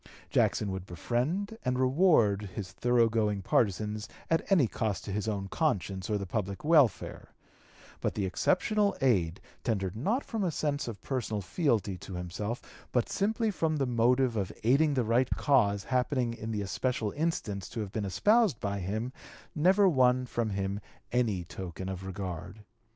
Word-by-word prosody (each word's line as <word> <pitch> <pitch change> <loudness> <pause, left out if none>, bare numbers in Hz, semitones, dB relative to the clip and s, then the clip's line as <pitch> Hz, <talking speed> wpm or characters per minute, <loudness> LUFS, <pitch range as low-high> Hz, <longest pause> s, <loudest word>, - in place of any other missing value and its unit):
Jackson 100 -2 +2
would 95 0 -5
befriend 160 - -2
and 125 0 0
reward 130 - +3
his 95 -3 -5
thorough 120 +2 +3
going 105 -3 0
partisans 105 +1 0 0.2
at 165 +4 +1
any 170 -9 +6
cost 110 -3 -2
to 100 - -5
his 105 +2 -2
own 100 -3 -2
conscience 95 - -1
or 105 - +1
the 100 - -4
public 100 0 -3
welfare; 150 - +2 0.6
but - - -2
the 100 - 0
exceptional 200 - +1
aid, 95 - +2 0.2
tendered 95 -5 -1
not 210 - 0
from 225 -4 -2
a 180 - +1
sense 145 -3 -1
of 115 -4 -7
personal 120 -6 -2
fealty 105 - 0
to 95 - -8
himself, 95 +7 -4 0.3
but 120 -2 +1
simply 220 +2 0
from 160 -5 0
the 140 - +1
motive 125 +1 +2
of 100 -4 -1
aiding 140 +5 +4
the 125 - +2
right 120 +3 +2
cause 100 -8 +3
happening 125 -1 0
in 110 -1 -6
the 105 -2 -2
especial 110 +1 -1
instance 125 - -2
to 115 - -6
have 100 -2 -5
been 110 0 -2
espoused 210 - +3
by 100 -1 -2
him, 110 +7 -3 0.4
never 190 +6 +4
won 130 -5 +4
from 120 -2 -2
him 100 0 -2 0.3
any 110 -7 +1
token 95 +1 -7
of 95 -1 -5
regard. 95 +1 -6
115 Hz, 165 wpm, -30 LUFS, 100-135 Hz, 0.6 s, any